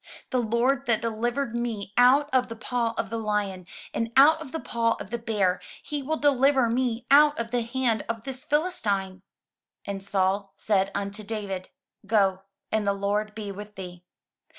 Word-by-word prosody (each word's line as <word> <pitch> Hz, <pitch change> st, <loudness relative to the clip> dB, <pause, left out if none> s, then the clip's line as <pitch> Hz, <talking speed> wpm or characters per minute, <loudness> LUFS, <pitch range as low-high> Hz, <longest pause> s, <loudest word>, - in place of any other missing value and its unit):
The 255 Hz, -, +2 dB
Lord 245 Hz, +4 st, +1 dB
that 230 Hz, -2 st, +3 dB
delivered 235 Hz, +3 st, -1 dB
me 225 Hz, -4 st, -3 dB
out 260 Hz, +4 st, +5 dB
of 255 Hz, -1 st, +3 dB
the 230 Hz, -, -6 dB
paw 230 Hz, 0 st, -2 dB
of 200 Hz, -, -2 dB
the 230 Hz, -, -2 dB
lion, 205 Hz, -4 st, -2 dB, 0.3 s
and 230 Hz, 0 st, -2 dB
out 310 Hz, +4 st, +7 dB
of 285 Hz, -5 st, -8 dB
the 320 Hz, -, -3 dB
paw 230 Hz, -4 st, 0 dB
of 195 Hz, -, -8 dB
the 235 Hz, -, -2 dB
bear, 210 Hz, -5 st, 0 dB, 0.2 s
he 295 Hz, -1 st, -4 dB
will 310 Hz, +4 st, -1 dB
deliver 275 Hz, -3 st, +3 dB
me 240 Hz, -1 st, -1 dB
out 295 Hz, +1 st, +7 dB
of 230 Hz, 0 st, -3 dB
the 245 Hz, -1 st, +1 dB
hand 235 Hz, -2 st, 0 dB
of 225 Hz, -1 st, -3 dB
this 260 Hz, 0 st, -6 dB
PhiUstine." 205 Hz, -, -1 dB, 0.6 s
And 200 Hz, -1 st, -4 dB
Saul 195 Hz, 0 st, 0 dB
said 195 Hz, -1 st, +1 dB
unto 200 Hz, +1 st, -3 dB
David, 200 Hz, -3 st, -4 dB, 0.4 s
"Go, 195 Hz, -3 st, +2 dB, 0.3 s
and 215 Hz, -2 st, 0 dB
the 200 Hz, -, +3 dB
Lord 205 Hz, +2 st, -1 dB
be 210 Hz, -2 st, -5 dB
with 210 Hz, +1 st, -9 dB
thee." 180 Hz, -2 st, -9 dB
225 Hz, 175 wpm, -26 LUFS, 200-250 Hz, 0.6 s, out